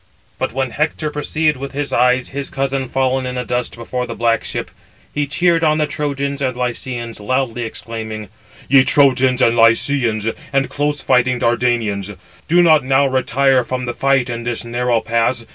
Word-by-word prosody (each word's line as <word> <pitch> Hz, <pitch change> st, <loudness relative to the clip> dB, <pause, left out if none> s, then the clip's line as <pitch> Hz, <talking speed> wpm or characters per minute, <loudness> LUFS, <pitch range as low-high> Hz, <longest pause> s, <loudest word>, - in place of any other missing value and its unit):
But -, -, -1 dB
when 130 Hz, 0 st, -2 dB
Hector 155 Hz, +3 st, -2 dB
perceived 150 Hz, 0 st, 0 dB
with 140 Hz, +2 st, -7 dB
his 145 Hz, 0 st, -3 dB
eyes 125 Hz, +1 st, +2 dB
his 140 Hz, 0 st, -5 dB
cousin 135 Hz, -1 st, -2 dB
fallen 130 Hz, 0 st, 0 dB
in 125 Hz, -, -4 dB
the 125 Hz, 0 st, -3 dB
dust 125 Hz, +2 st, -2 dB
before 125 Hz, +1 st, -4 dB
the 115 Hz, -, -6 dB
black 115 Hz, -1 st, +1 dB
ship, -, -, -5 dB, 0.4 s
he 145 Hz, -1 st, -1 dB
cheered 170 Hz, +3 st, +2 dB
on 155 Hz, -1 st, +3 dB
the 155 Hz, -, +2 dB
Trojans 140 Hz, -1 st, -3 dB
and 130 Hz, -2 st, -1 dB
Lycians, 120 Hz, -2 st, -4 dB
loudly 120 Hz, +2 st, -1 dB
exclaiming: 110 Hz, -2 st, -6 dB, 0.4 s
"Ye 135 Hz, -1 st, +6 dB
Trojans 130 Hz, -2 st, +3 dB
and 115 Hz, -, +3 dB
Lycians, 115 Hz, -1 st, +3 dB, 0.2 s
and 135 Hz, 0 st, 0 dB
close 145 Hz, 0 st, -1 dB
fighting 125 Hz, 0 st, +2 dB
Dardanians, 115 Hz, -5 st, 0 dB, 0.3 s
do 175 Hz, +2 st, +4 dB
not 155 Hz, -4 st, +5 dB
now 135 Hz, +2 st, +3 dB
retire 130 Hz, 0 st, +2 dB
from 125 Hz, +1 st, -4 dB
the 120 Hz, -, -3 dB
fight 135 Hz, -1 st, +1 dB
in 120 Hz, -1 st, -4 dB
this 120 Hz, 0 st, -3 dB
narrow 120 Hz, -1 st, 0 dB
pass. 115 Hz, +1 st, 0 dB
130 Hz, 175 wpm, -18 LUFS, 120-140 Hz, 0.4 s, Ye